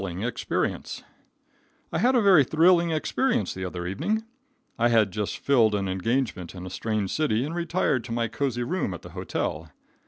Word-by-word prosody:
A -, -, -5 dB
Thrilling 95 Hz, +1 st, -4 dB
Experience. 120 Hz, 0 st, -2 dB, 0.9 s
I -, -, +1 dB
had 255 Hz, +2 st, +3 dB
a 240 Hz, -, +4 dB
very 185 Hz, -7 st, +7 dB
thrilling 170 Hz, +4 st, +4 dB
experience 160 Hz, -, 0 dB
the 95 Hz, -, -6 dB
other 90 Hz, -1 st, -5 dB
evening. 170 Hz, -, -1 dB, 0.6 s
I 120 Hz, -, +4 dB
had 115 Hz, -4 st, +3 dB
just 105 Hz, +1 st, -3 dB
filled 115 Hz, -6 st, +3 dB
an 100 Hz, -1 st, -1 dB
engagement 95 Hz, -1 st, -2 dB
in 90 Hz, 0 st, -7 dB
a 90 Hz, -, -7 dB
strange 105 Hz, -2 st, -2 dB
city, 135 Hz, -6 st, +1 dB
and 155 Hz, -, -5 dB
retired 170 Hz, -7 st, 0 dB
to 120 Hz, -, -8 dB
my 115 Hz, 0 st, 0 dB
cozy 125 Hz, -2 st, -2 dB
room 140 Hz, -, -2 dB
at -, -, -11 dB
the -, -, -10 dB
hotel. 80 Hz, +1 st, -3 dB
120 Hz, 185 wpm, -26 LUFS, 95-160 Hz, 0.9 s, very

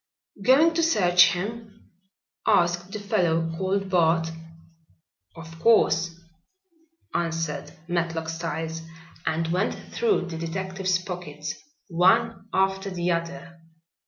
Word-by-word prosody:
"Going 280 Hz, +10 st, +5 dB
to 330 Hz, -, +1 dB
search 180 Hz, -, +5 dB
him?" 215 Hz, +3 st, -7 dB, 0.6 s
asked 175 Hz, -3 st, +2 dB
the 215 Hz, -, -4 dB
fellow 170 Hz, -6 st, 0 dB
called 195 Hz, +2 st, -1 dB
Bart. 165 Hz, -2 st, +3 dB, 1.1 s
"Of 165 Hz, 0 st, -11 dB
course," 170 Hz, -5 st, +3 dB, 0.9 s
answered 165 Hz, -3 st, -2 dB, 0.2 s
Matlock 165 Hz, -2 st, -1 dB
Styles 165 Hz, 0 st, -4 dB, 0.5 s
and 160 Hz, +1 st, 0 dB
went 185 Hz, +5 st, 0 dB, 0.2 s
through 450 Hz, -, +1 dB
the 165 Hz, -1 st, -5 dB
detective's 185 Hz, +2 st, -1 dB
pockets 175 Hz, -5 st, -6 dB, 0.3 s
one 185 Hz, +2 st, +2 dB
after 195 Hz, +1 st, +1 dB
the 180 Hz, -1 st, -1 dB
other. 170 Hz, +1 st, -4 dB
175 Hz, 100 wpm, -25 LUFS, 165-195 Hz, 1.1 s, Going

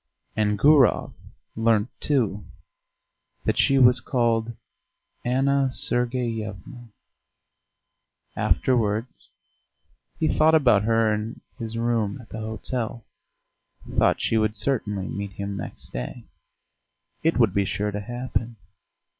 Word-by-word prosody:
And 105 Hz, -1 st, +1 dB
Gurov 140 Hz, 0 st, +4 dB, 0.4 s
learnt, 110 Hz, 0 st, +2 dB
too, 110 Hz, -9 st, +2 dB, 1.0 s
that -, -, 0 dB
she 135 Hz, -, +4 dB
was 125 Hz, -1 st, +6 dB
called 115 Hz, -2 st, 0 dB, 0.7 s
Anna 135 Hz, +2 st, +2 dB
Sergeyevna. 120 Hz, -2 st, -1 dB, 1.5 s
Afterwards 115 Hz, -2 st, 0 dB, 0.9 s
he 160 Hz, -, +1 dB
thought 160 Hz, +1 st, +4 dB
about 120 Hz, -9 st, +4 dB
her 115 Hz, -1 st, +3 dB
in 105 Hz, +2 st, -5 dB, 0.2 s
his 115 Hz, -1 st, -5 dB
room 115 Hz, -3 st, 0 dB
at 115 Hz, -, -14 dB
the 110 Hz, -, -7 dB
hotel 110 Hz, +1 st, -4 dB, 0.9 s
thought -, -, +3 dB
she 115 Hz, -, +1 dB
would 110 Hz, 0 st, 0 dB
certainly 105 Hz, -4 st, -1 dB
meet 100 Hz, -1 st, -5 dB
him 100 Hz, +1 st, -5 dB
next 95 Hz, -, -8 dB
day; 60 Hz, 0 st, -6 dB, 1.0 s
it 165 Hz, +1 st, +1 dB
would 115 Hz, -7 st, +3 dB
be 100 Hz, -, +2 dB
sure 105 Hz, +2 st, -2 dB
to 105 Hz, -, -4 dB
happen. 120 Hz, +1 st, -4 dB
115 Hz, 110 wpm, -24 LUFS, 105-125 Hz, 1.5 s, was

